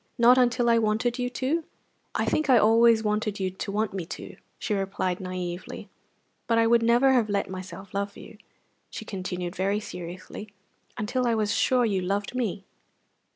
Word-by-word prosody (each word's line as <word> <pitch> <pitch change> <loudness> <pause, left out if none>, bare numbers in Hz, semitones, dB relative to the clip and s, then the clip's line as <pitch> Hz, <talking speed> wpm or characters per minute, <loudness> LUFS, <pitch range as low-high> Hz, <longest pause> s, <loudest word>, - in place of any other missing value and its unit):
"Not 245 +2 +6
until 245 -1 +2
I 230 -1 +5
wanted 225 +3 0
you 245 0 0
to?" 275 +6 -1 0.5
"I - - +1
think 310 -2 0
I 255 - +7
always 225 +1 +5
wanted 210 -1 -1
you 190 -1 -1
to 190 +2 -5
want 215 0 -1
me 190 -3 -3
to," - - -8 0.2
she 215 - -2
replied, 195 -2 -1
naïvely; 185 -1 -6 0.6
"but 230 - +2
I 230 - +4
would 235 0 +4
never 240 +4 +4
have 235 -4 +2
let 200 -2 -1
myself 185 +1 -8
love 200 0 -3
you," 210 - -12 0.5
she 220 - -7
continued 180 -3 -4
very 195 +3 0
seriously, 185 +2 -8 0.4
"until 245 +4 -1
I 230 - +2
was 210 -2 0
sure 250 -2 +3
you 195 -4 0
loved 200 +4 -2
me." 215 -6 -2
215 Hz, 175 wpm, -26 LUFS, 190-235 Hz, 0.6 s, I